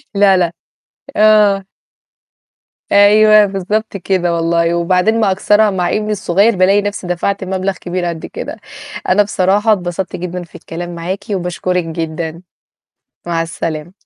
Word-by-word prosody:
لا، 195 Hz, -2 st, +5 dB
لا، 175 Hz, -2 st, +1 dB, 0.7 s
آه. 210 Hz, -2 st, +4 dB, 1.3 s
أيوه، 210 Hz, +1 st, +6 dB
بالضبط 200 Hz, +2 st, -3 dB
كده، 180 Hz, -2 st, 0 dB
والله 170 Hz, 0 st, +1 dB
وبعدين 180 Hz, +6 st, +1 dB
ما 205 Hz, -3 st, +2 dB
أكثرها 210 Hz, +2 st, +3 dB
مع 180 Hz, -2 st, -1 dB
ابني 215 Hz, 0 st, -1 dB
الصغيّر 200 Hz, +2 st, +2 dB
بالاقي 195 Hz, +3 st, +3 dB
نفسي 205 Hz, -3 st, -4 dB
دَفَعْت 190 Hz, +3 st, -2 dB
مبلغ 190 Hz, +1 st, -2 dB
كبير 180 Hz, 0 st, -4 dB
قد 170 Hz, -2 st, -4 dB
كده، -, -, -7 dB, 0.5 s
أنا 205 Hz, +3 st, +4 dB
بصراحة 205 Hz, +2 st, +2 dB
اتبسطت 180 Hz, -1 st, -4 dB
جدًا 180 Hz, 0 st, -5 dB
في 170 Hz, -, -17 dB
الكلام 175 Hz, +1 st, -7 dB
معاكِ 180 Hz, +4 st, -4 dB
وباشكرِك 180 Hz, 0 st, -2 dB
جدًا 165 Hz, 0 st, -5 dB, 0.8 s
مع 170 Hz, -1 st, -1 dB
السلامة. 165 Hz, +2 st, -6 dB
185 Hz, 130 wpm, -15 LUFS, 175-205 Hz, 1.3 s, أيوه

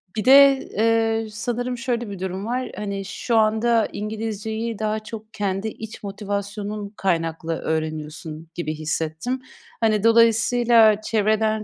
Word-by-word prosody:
Bir 215 Hz, -, -2 dB
de, 275 Hz, +1 st, +8 dB
eee, 225 Hz, +1 st, +1 dB
sanırım 245 Hz, +3 st, -3 dB
şöyle 240 Hz, -2 st, -2 dB
bir 195 Hz, -, -7 dB
durum 190 Hz, +2 st, -4 dB
var, 250 Hz, +2 st, -2 dB
hani, 200 Hz, -1 st, -4 dB
şu 230 Hz, +4 st, -1 dB
anda 220 Hz, +1 st, +3 dB
İngilizceyi 220 Hz, +1 st, -4 dB
daha 215 Hz, 0 st, -1 dB
çok 220 Hz, 0 st, -10 dB
kendi 200 Hz, 0 st, -2 dB
iç 220 Hz, 0 st, -8 dB
motivasyonun 205 Hz, +1 st, -4 dB
kaynaklı 165 Hz, -3 st, -1 dB
öğreniyorsun 155 Hz, 0 st, -4 dB
gibi 155 Hz, -3 st, -3 dB
hissettim. 160 Hz, +10 st, -3 dB, 0.4 s
Hani, 215 Hz, -2 st, +2 dB
dolayısıyla 230 Hz, -1 st, +5 dB
çevreden 215 Hz, 0 st, +1 dB
215 Hz, 125 wpm, -23 LUFS, 195-225 Hz, 0.4 s, de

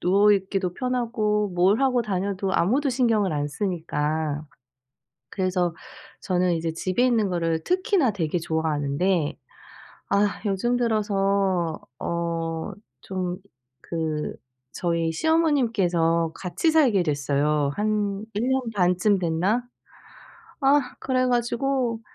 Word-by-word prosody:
누워있기도 195 Hz, -1 st, +2 dB
편하고 230 Hz, -5 st, 0 dB
뭘 185 Hz, +6 st, +2 dB
하고 260 Hz, -2 st, +3 dB
다녀도 195 Hz, -1 st, -2 dB
아무도 255 Hz, -, +2 dB
신경을 225 Hz, -7 st, +2 dB
안 145 Hz, 0 st, -1 dB
쓰니까. 155 Hz, -3 st, -2 dB, 0.8 s
그래서 180 Hz, -3 st, 0 dB, 0.5 s
저는 180 Hz, -1 st, +1 dB
이제 165 Hz, 0 st, -2 dB
집에 185 Hz, +8 st, 0 dB
있는 230 Hz, -5 st, +2 dB
거를 165 Hz, -2 st, -1 dB
특히나 370 Hz, -, +2 dB
되게 175 Hz, -2 st, -1 dB
좋아하는데 160 Hz, +1 st, 0 dB, 0.7 s
아 200 Hz, +1 st, +2 dB
요즘 225 Hz, +5 st, +1 dB
들어서 195 Hz, -6 st, +1 dB, 0.2 s
어 165 Hz, -1 st, -2 dB, 0.3 s
좀 185 Hz, -2 st, -3 dB, 0.4 s
그 160 Hz, -2 st, -3 dB, 0.4 s
저희 170 Hz, -2 st, -1 dB
시어머님께서 195 Hz, -, +2 dB
같이 185 Hz, -, 0 dB
살게 255 Hz, -, +4 dB
됐어요. 145 Hz, -1 st, +1 dB
한 210 Hz, -1 st, -1 dB
1 210 Hz, +3 st, -1 dB
년 265 Hz, 0 st, +2 dB
반쯤 180 Hz, +2 st, +3 dB
됐나? 180 Hz, +7 st, +1 dB, 1.0 s
아 280 Hz, +1 st, +5 dB, 0.2 s
그래 255 Hz, -1 st, +1 dB
가지고 245 Hz, 0 st, 0 dB
190 Hz, 225 characters per minute, -24 LUFS, 165-230 Hz, 1.0 s, 아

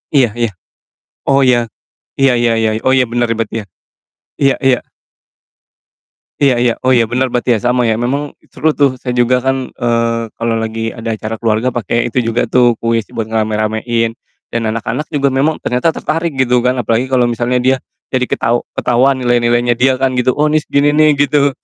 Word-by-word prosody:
Iya 130 Hz, -4 st, +4 dB
iya, 120 Hz, -1 st, +1 dB, 0.8 s
oh 135 Hz, 0 st, +3 dB
iya, 125 Hz, -1 st, +4 dB, 0.6 s
iya 135 Hz, -2 st, +4 dB
iya 120 Hz, -1 st, +2 dB
iya 110 Hz, -, +2 dB, 0.2 s
oh 130 Hz, -, +4 dB
iya 130 Hz, -, +3 dB
bener 120 Hz, 0 st, 0 dB
berarti 115 Hz, -1 st, -3 dB
ya? -, -, -13 dB, 0.8 s
Iya 135 Hz, -1 st, +4 dB
iya. 130 Hz, -2 st, +4 dB, 1.6 s
Iya 135 Hz, -3 st, +4 dB
iya, 120 Hz, -1 st, +2 dB
oh 130 Hz, -, +4 dB
iya 115 Hz, -3 st, +2 dB
bener 125 Hz, +1 st, -1 dB
berarti 125 Hz, +1 st, -1 dB
ya -, -, -5 dB
sama 125 Hz, +1 st, +2 dB
ya 110 Hz, -, +1 dB
memang 140 Hz, +5 st, -2 dB, 0.2 s
seru 155 Hz, +4 st, +1 dB
tuh 140 Hz, -3 st, +3 dB
saya 125 Hz, -, -5 dB
juga 125 Hz, +1 st, +3 dB
kan, 135 Hz, 0 st, -2 dB
eee, 115 Hz, -1 st, -1 dB
kalo 115 Hz, 0 st, -1 dB
lagi 115 Hz, 0 st, -3 dB
ada 115 Hz, 0 st, -6 dB
acara 110 Hz, +1 st, -5 dB
keluarga 115 Hz, +2 st, 0 dB
pake 120 Hz, +1 st, -1 dB
itu -, -, -3 dB
juga 120 Hz, +2 st, 0 dB
tuh 120 Hz, -2 st, +3 dB
kuis 115 Hz, -1 st, -1 dB
buat 115 Hz, -, -4 dB
ngerame-ramein, 110 Hz, +1 st, -1 dB, 0.4 s
dan 115 Hz, -, 0 dB
anak-anak 115 Hz, +7 st, -3 dB
juga 140 Hz, -3 st, 0 dB
memang 145 Hz, +4 st, +1 dB
ternyata 125 Hz, +6 st, 0 dB
tertarik 165 Hz, -1 st, -2 dB
gitu 125 Hz, -2 st, +2 dB
kan 125 Hz, +1 st, 0 dB
apalagi 120 Hz, +2 st, 0 dB
kalo 130 Hz, -2 st, +2 dB
misalnya 120 Hz, +1 st, 0 dB
dia, 130 Hz, +2 st, +2 dB, 0.4 s
jadi 130 Hz, -1 st, +1 dB
ketahu 120 Hz, +1 st, 0 dB, 0.2 s
ketahuan 130 Hz, +3 st, +2 dB
nilai-nilainya 120 Hz, -1 st, +2 dB
dia 130 Hz, -1 st, +3 dB
kan 130 Hz, 0 st, 0 dB
gitu, 125 Hz, 0 st, +1 dB
"Oh 150 Hz, -, +2 dB
ini 155 Hz, 0 st, +2 dB
segini 145 Hz, 0 st, +1 dB
nih," 155 Hz, 0 st, +4 dB, 0.2 s
gitu, 145 Hz, +1 st, +2 dB
125 Hz, 185 wpm, -15 LUFS, 115-130 Hz, 1.6 s, Iya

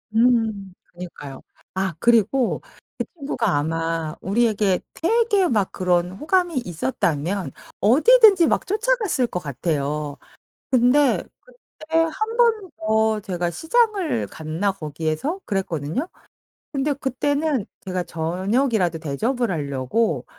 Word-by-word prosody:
음 225 Hz, -5 st, +2 dB, 0.2 s
그니까요. 160 Hz, -6 st, -9 dB, 0.3 s
아 190 Hz, -2 st, -1 dB
그리고 235 Hz, +3 st, +2 dB, 0.4 s
그 -, -, -2 dB
친구가 265 Hz, -, -1 dB
아마 165 Hz, +1 st, -2 dB
우리에게 205 Hz, -2 st, +1 dB
되게 415 Hz, 0 st, +2 dB
막 210 Hz, -, 0 dB
그런 180 Hz, -1 st, +1 dB
호감이 340 Hz, -, 0 dB
있었다면 165 Hz, +3 st, -2 dB, 0.3 s
어디든지 385 Hz, -, +6 dB
막 -, -, +1 dB
쫓아갔을 425 Hz, -, +1 dB
거 180 Hz, -, -3 dB
같아요. 150 Hz, -1 st, -3 dB, 0.5 s
근데 255 Hz, +2 st, +4 dB, 0.2 s
그때 325 Hz, -10 st, -5 dB
1 435 Hz, +8 st, 0 dB
번 445 Hz, -7 st, +2 dB
더 220 Hz, 0 st, +1 dB
제가 180 Hz, -4 st, -2 dB
시장을 370 Hz, -, +1 dB
갔나 160 Hz, +6 st, -2 dB
거기에서 160 Hz, -, -3 dB
그랬거든요. 190 Hz, -, -2 dB, 0.7 s
근데 285 Hz, +1 st, 0 dB
그때는 280 Hz, -1 st, -1 dB, 0.2 s
제가 185 Hz, -1 st, -2 dB
저녁이라도 180 Hz, +3 st, 0 dB
대접을 225 Hz, -, -1 dB
하려고 140 Hz, -, -1 dB
215 Hz, 245 characters per minute, -22 LUFS, -, 0.7 s, 어디든지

